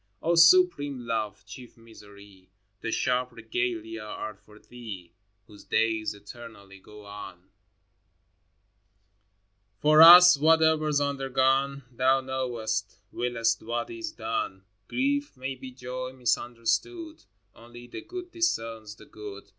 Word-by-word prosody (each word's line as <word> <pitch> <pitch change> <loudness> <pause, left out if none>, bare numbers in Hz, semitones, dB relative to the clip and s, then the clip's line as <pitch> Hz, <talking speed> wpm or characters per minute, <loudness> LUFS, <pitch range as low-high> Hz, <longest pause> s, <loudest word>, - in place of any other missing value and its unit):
O 170 - 0
supreme 165 -4 +5
Love, 105 -4 -3
chief 125 -2 -12
Misery, 100 -4 -17 0.3
The 115 - -4
sharp 125 +2 0
regalia 115 -1 -4
are 105 0 -6
for 105 +2 -20
Thee 105 -8 -11 0.3
Whose 105 0 -16
days 110 -2 0
eternally 100 -2 -13
go 105 +2 -15
on! 100 -2 -11 2.3
For 155 +6 +5
us, 175 0 +10
—whatever's 160 -1 +3
undergone, 135 0 0
Thou 130 +2 +2
knowest, 130 -4 -3
wiliest 115 -2 -1
what 120 +1 -4
is 115 -1 -6
done. 110 -4 -4 0.2
Grief 285 - -1
may 130 +1 -4
be 130 0 -10
joy 130 0 -7
misunderstood: 125 - -2 0.3
Only 120 +1 -14
the 120 - -9
Good 360 -1 -9
discerns 115 - -2
the - - -16
good. 105 -2 -11
120 Hz, 115 wpm, -27 LUFS, 110-140 Hz, 2.3 s, us